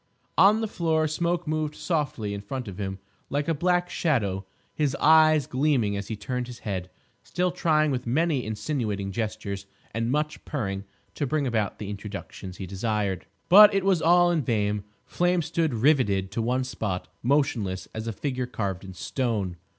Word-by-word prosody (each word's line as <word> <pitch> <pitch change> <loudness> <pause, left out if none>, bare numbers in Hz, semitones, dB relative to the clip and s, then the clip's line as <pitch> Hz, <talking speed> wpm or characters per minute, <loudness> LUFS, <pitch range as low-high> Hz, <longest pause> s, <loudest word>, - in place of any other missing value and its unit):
On 205 +5 +6
the 220 - 0
floor 160 -5 +1
Smoke 170 +2 -1
moved 155 -1 -1
softly 140 - -2
in 100 - -5
front 125 +4 -5
of 100 0 -7
him 95 -1 -3 0.3
like 145 +1 -1
a 165 - +2
black 175 +3 +1
shadow, 100 - 0 0.3
his 145 -3 0
eyes 155 -1 +5
gleaming 130 -7 +1
as 100 0 -4
he 110 - -3
turned 125 +4 -3
his 125 -1 -8
head, 95 -3 -3 0.3
still 180 0 -1
trying 155 -4 +2
with 125 -2 -3
many 145 +1 +1
insinuating 105 -3 -2
gestures 100 -2 -4 0.3
and 115 +2 -1
much 150 +2 -1
purring 100 -9 -3 0.3
to 145 - -2
bring 150 0 0
about 110 -5 -1
the 105 -1 -5
introductions 100 -2 -7
he 95 - -5
desired. 100 0 -2 0.2
But 205 +2 +9
it 195 -1 +1
was 190 -4 +3
all 175 +1 +5
in 165 -3 +1
vain. 105 -4 0 0.2
Flame 175 -1 +1
stood 160 0 0
riveted 110 -7 +2
to 115 - -1
one 125 +3 +1
spot, 105 -7 -3
motionless 120 -9 0
as 110 +1 -5
a - - 0
figure 130 +1 -3
carved 100 -6 -3
in 95 -1 -9
stone. 105 -7 -2
125 Hz, 175 wpm, -26 LUFS, 100-155 Hz, 0.3 s, But